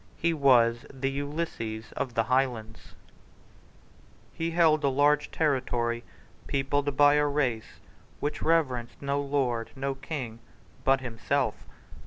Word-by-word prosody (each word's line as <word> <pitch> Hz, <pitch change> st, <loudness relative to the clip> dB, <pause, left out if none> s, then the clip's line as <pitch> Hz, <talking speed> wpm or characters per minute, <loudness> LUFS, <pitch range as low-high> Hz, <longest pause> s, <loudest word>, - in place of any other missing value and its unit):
He 170 Hz, 0 st, +1 dB
was 125 Hz, -5 st, +4 dB
the 135 Hz, 0 st, -2 dB
Ulysses 140 Hz, -7 st, -4 dB
of 125 Hz, -4 st, -4 dB
the 115 Hz, -, +3 dB
Highlands, 120 Hz, -3 st, -1 dB, 1.4 s
He 165 Hz, 0 st, -2 dB
held 160 Hz, -2 st, +3 dB
a 140 Hz, -, +3 dB
large 145 Hz, +2 st, +3 dB
territory 120 Hz, -6 st, 0 dB, 0.4 s
peopled 140 Hz, +1 st, 0 dB
by 145 Hz, 0 st, +7 dB
a 150 Hz, 0 st, +3 dB
race 130 Hz, -6 st, -1 dB, 0.4 s
which 145 Hz, -, -3 dB
reverenced 130 Hz, -8 st, 0 dB
no 140 Hz, 0 st, -1 dB
lord, 130 Hz, -5 st, -1 dB
no 135 Hz, 0 st, -2 dB
king 135 Hz, -4 st, -6 dB, 0.4 s
but 135 Hz, 0 st, +3 dB
himself. 120 Hz, -3 st, -1 dB
135 Hz, 120 wpm, -28 LUFS, 120-145 Hz, 1.4 s, by